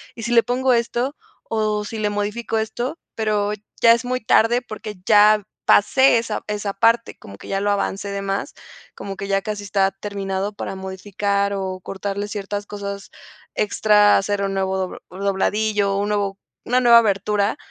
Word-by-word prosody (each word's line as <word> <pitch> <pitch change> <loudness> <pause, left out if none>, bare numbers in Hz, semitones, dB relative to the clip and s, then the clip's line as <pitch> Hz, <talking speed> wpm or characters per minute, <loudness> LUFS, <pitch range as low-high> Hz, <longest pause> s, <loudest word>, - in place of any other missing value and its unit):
¿y 230 - -8
si 235 - -3
le 235 -1 +6
pongo 250 +2 +1
esto?, 240 +4 0 0.3
o, 215 -1 -1
¿si 220 +1 -6
le 210 -1 0
modifico 210 +3 -2
esto?". 240 +7 -3 0.2
Pero, 210 -2 0 0.3
ya 230 - +7
es 235 +1 +2
muy 255 0 -2
tarde 230 +3 +3
porque 215 -2 -8
ya 210 0 +6 0.2
pasé 260 +4 +5
esa 230 -2 -3
esa 210 -1 -2
parte, 230 +3 +2
como 100 0 -12
que - - -12
ya 195 - 0
lo 205 - 0
avancé 200 0 -2
de 200 0 -3
más, 195 0 -3 0.4
como 195 -1 -7
que 195 - -5
ya 195 0 +1
casi 210 0 -5
está 195 0 +1
terminado 195 0 -4
para 200 - -5
modificar, 200 +1 -2
o 190 -1 -4
cortarle 200 +2 -4
ciertas 205 0 -4
cosas 200 -1 -7 0.4
extra, 210 -1 +4
hacer 200 0 -1
un 195 0 -1
nuevo 190 0 -1
do 185 -1 -3
dobladillo 200 +2 0
o - - 0
un 205 - -1
nuevo 200 -1 -1 0.2
una 250 +2 +2
nueva 235 -2 +7
abertura, 205 +1 0
205 Hz, 175 wpm, -21 LUFS, 195-220 Hz, 0.4 s, ya